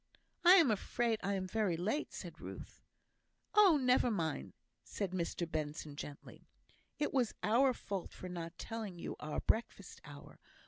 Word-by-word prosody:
"I 355 +1 +9
am 325 -11 +6
afraid 225 +2 0
I 200 0 0
am 190 -1 -2
very 190 -3 0
late," 215 - -1
said - - -8
Ruth. - - -9 0.7
"Oh, 395 -7 +7
never 250 -1 +4
mind," 160 - -2 0.3
said 200 -3 -3
Mr 170 -1 -2
Benson, 150 -2 -4
gently. 145 0 -9 0.5
"It 295 - -1
was 250 -5 +1
our 255 +5 +4
fault 200 -6 -5
for 185 - -8
not 170 -1 -6
telling 220 -5 -5
you - - -5
our 150 0 -3
breakfast 220 -4 -1
hour. 145 -1 -12
200 Hz, 150 wpm, -35 LUFS, 170-240 Hz, 0.7 s, I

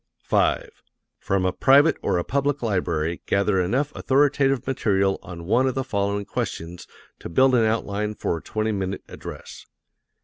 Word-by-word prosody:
5. - - +1 0.5
From 95 -1 0
a 90 - +1
private 145 +4 +5
or - - 0
a 85 - 0
public 140 +2 -1
library 85 -6 -1
gather 100 -1 +2
enough 130 +11 -1
authoritative 135 -1 +2
material 100 -7 +1
on 85 -2 -9
one 120 +8 +2
of 130 - -1
the 135 - -1
following 100 -4 -1
questions 85 -1 -5 0.3
to - - -8
build 130 +9 +4
an 115 -3 +4
outline 105 -1 -1
for 85 - -2
a - - -9
twenty 110 0 -2
minute 95 -2 -3
address. - - -10
105 Hz, 160 wpm, -24 LUFS, 95-130 Hz, 0.5 s, private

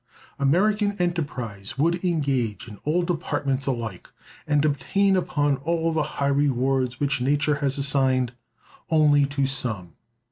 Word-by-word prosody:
American 205 +9 +2
enterprise 130 - -3
would 170 +5 +1
engage 140 - -1
in 105 -2 -10
all 165 +4 +1
departments 145 -6 -1
alike, 115 -8 -4 0.4
and 150 0 +2
obtain 155 +8 +2
upon 145 -6 +1
all 165 +3 0
the 160 - +1 0.2
high 140 - 0
rewards 135 -2 +1
which 140 -3 0
nature 145 +3 +1
has 140 -2 0
assigned 135 -3 +1 0.6
only 150 -3 +4
to 140 -1 -1
some. 110 - -3
140 Hz, 130 wpm, -24 LUFS, 130-160 Hz, 0.6 s, only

